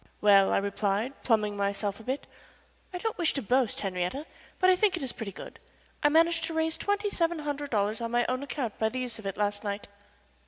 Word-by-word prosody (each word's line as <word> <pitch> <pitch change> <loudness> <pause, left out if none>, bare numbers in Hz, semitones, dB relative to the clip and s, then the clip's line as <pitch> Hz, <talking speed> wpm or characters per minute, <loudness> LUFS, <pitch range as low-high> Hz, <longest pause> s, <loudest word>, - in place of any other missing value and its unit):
"Well," 200 -2 +6
I - - +3
replied, 200 +4 0
pluming 210 -3 +2
myself 200 0 -1
a - - -11
bit, 260 +5 -3 0.7
"I 360 - -4
don't 435 +2 -3
wish 340 - +2
to 275 - -1
boast, 250 +2 +1
Henriette, 185 - -2 0.3
but 370 - +3
I - - +5
think 375 -1 +2
it 325 - -5
is 260 - -1
pretty 220 -4 -6
good. - - -10 0.4
I 295 - +5
managed 330 +2 +4
to 325 - -5
raise 320 0 +1
twenty 410 0 0
seven 335 -2 +1
hundred 290 -1 -3
dollars 215 0 0
on 230 - -2
my 240 0 +2
own 255 +1 -1
account 275 -5 -4
by 220 - +2
the 255 - -5
use 250 -3 -4
of 205 - -6
it 195 - -4
last 205 0 0
night." 205 0 -4
245 Hz, 225 wpm, -29 LUFS, 205-320 Hz, 0.7 s, Well